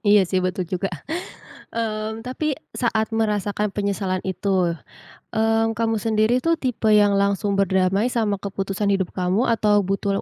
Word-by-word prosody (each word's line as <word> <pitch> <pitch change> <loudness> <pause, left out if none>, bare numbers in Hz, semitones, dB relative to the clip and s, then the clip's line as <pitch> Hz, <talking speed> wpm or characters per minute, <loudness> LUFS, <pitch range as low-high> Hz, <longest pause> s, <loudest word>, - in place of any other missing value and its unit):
Iya 205 -1 +7
sih 185 +1 0
betul 185 0 -1
juga. 185 +2 -2 0.8
Mmm, 220 0 -3
tapi 290 +3 -1 0.2
saat 225 -2 0
merasakan 210 -1 0
penyesalan 195 -2 -1
itu, 185 -2 0 0.6
eee, 225 0 +3
kamu 225 -1 +1
sendiri 225 +3 +2
tuh 330 0 +2
tipe 245 -4 -1
yang 205 -1 +5
langsung 200 0 +1
berdamai 195 +4 +2
sama 220 -4 0
keputusan 195 +1 -2
hidup 195 -2 0
kamu 185 +6 +1
atau 210 -3 +3
butuh 195 +1 -1
205 Hz, 140 wpm, -22 LUFS, 195-225 Hz, 0.8 s, Iya